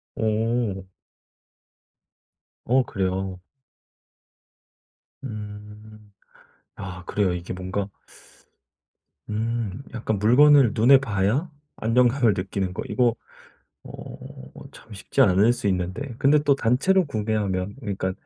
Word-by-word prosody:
오. 110 -3 -1 1.7
어 130 +2 +3
그래요. 95 -2 -3 1.8
음 105 -1 -10 0.7
아 90 -2 -7
그래요. 100 -4 0
이게 90 0 -6
뭔가 95 +2 -4 1.4
음 110 0 -3
약간 110 -3 -2
물건을 130 +3 +6
눈에 125 +5 +6
봐야 115 - 0 0.3
안정감을 120 0 +3
느끼는 95 0 -3
거 - - -4
이거 120 -2 +2 0.7
어 - - -10 0.5
참 110 - -16
쉽지 105 +7 0
않을 100 0 +4
수 120 -4 -5
있는데 95 +8 -3
근데 145 +2 +4
또 145 -2 +3
단체로 150 +10 +2
구매하면 105 -5 -2
그러니까 95 -4 -3
105 Hz, 190 characters per minute, -24 LUFS, 95-120 Hz, 1.8 s, 물건을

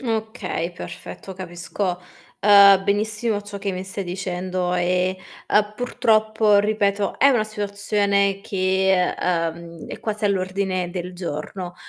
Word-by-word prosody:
Okay, 220 -7 -3
perfetto. 190 +2 -9
Capisco, 180 0 -4 0.4
uhm, 200 -1 +8
benissimo 210 +1 -1
ciò 205 0 -8
che 200 0 -3
mi 185 +1 -5
stai 195 +1 -5
dicendo, 180 0 -2
e, 180 +1 +1 0.3
uhm, 210 0 +2
purtroppo, 220 -3 +2
ripeto, 205 -1 0
è 280 - +6
una 240 -6 +3
situazione 200 -1 0
che, 190 -1 +1
uhm, 170 -1 -2
è - - -8
quasi 215 -1 -3
all'ordine 185 -2 0
del 180 0 -5
giorno. 175 +1 -5
195 Hz, 120 wpm, -22 LUFS, 180-210 Hz, 0.4 s, uhm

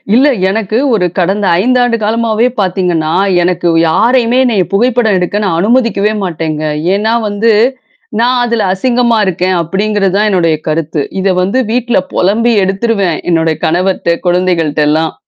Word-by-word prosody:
இல்ல, 275 +4 +4 0.2
எனக்கு 215 +1 -2 0.2
ஒரு 185 -5 +1
கடந்த 195 +3 0 0.2
5 250 +2 +1
ஆண்டு 235 -1 0
காலமாவே 225 +2 0
பாத்தீங்கன்னா, 175 -4 -1 0.3
எனக்கு 175 0 -1 0.2
யாரையுமே 240 +5 +2
என்னைய 215 -7 +1
புகைப்படம் 230 -1 +2
எடுக்க 185 +4 -2
நான் 165 -3 -1
அனுமதிக்கவே 215 -1 +1
மாட்டேங்க. 160 -3 -3 0.3
ஏன்னா 220 +3 0
வந்து, 210 +3 +1 0.7
"நான் 245 +2 +2
அதுல 230 -4 -1
அசிங்கமா 240 +1 +1
இருக்கேன்." 185 0 -1
அப்படிங்கிறது 195 +2 -1
தான் 210 +1 +2
என்னுடைய 170 -5 +1
கருத்து. 155 -1 -2 0.2
இத 190 -1 +1
வந்து, 200 +8 0
வீட்ல 245 -2 0
பொலம்பி 230 +6 +1
எடுத்துருவன். 195 -2 -1
என்னுடைய 160 -2 +1
கணவர்ட்ட, 175 0 0
குழந்தைகள்ட்டல்லாம். 160 -3 0
195 Hz, 135 wpm, -11 LUFS, 175-230 Hz, 0.7 s, இல்ல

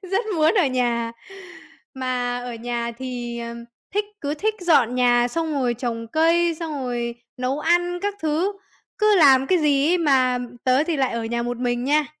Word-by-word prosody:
rất 390 +5 -1
muốn 315 +5 +3
ở 365 -8 +4
nhà. 240 -3 0 0.8
Mà 250 -1 -2
ở 245 -1 -6
nhà 235 0 -3
thì, 240 -2 -5
ừm, 235 0 -7 0.3
thích 415 0 +1 0.2
cứ 290 +1 -2
thích 430 +7 -1
dọn 285 -9 +3
nhà 245 -1 +3
xong 325 +3 -2
rồi 250 -3 0
trồng 230 -1 -4
cây, 335 +4 +2
xong 325 -2 -4
rồi 240 -1 -3 0.2
nấu 255 +3 -2
ăn 350 +2 +1
các 410 0 -1
thứ. 320 +6 0 0.5
Cứ 425 -1 +4
làm 270 -5 +6
cái 365 +5 +3
gì 290 -2 +2
ấy, 360 - +3
mà 260 -5 +3 0.3
tớ 260 +4 +3
thì 335 -2 -1
lại 265 -2 0
ở 230 -1 -3
nhà 235 +1 -2
một 245 +1 -3
mình 245 0 -1
nha. 295 +2 +2
260 Hz, 185 wpm, -22 LUFS, 240-325 Hz, 0.8 s, làm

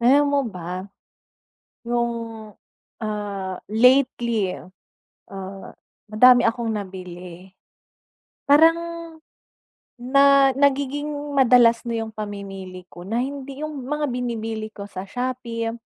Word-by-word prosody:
Alam 270 +5 +5
mo 285 - +3
ba? 180 -4 -8 1.2
Noong, 235 0 0 0.9
ah, 205 -3 -4
lately, 235 -3 +3 0.8
ah, 195 0 -8 0.4
madami 245 +3 +7
akong 230 0 0
nabili. 185 -1 -9 1.0
Parang 325 +3 +6 1.2
na 275 +2 +5
nagiging 280 +1 0 0.3
madalas 240 -2 +6
na 235 - -2
yung 220 - -9
pamimili 195 -3 -7
ko 175 - -11
na 225 - 0
hindi 280 +1 -7
yung 310 0 -5 0.2
mga 300 0 0
binibili 225 -3 -3
ko 200 - -7
sa 185 -2 -6
Shopee. 245 -2 -3
230 Hz, 100 wpm, -23 LUFS, 200-265 Hz, 1.2 s, madami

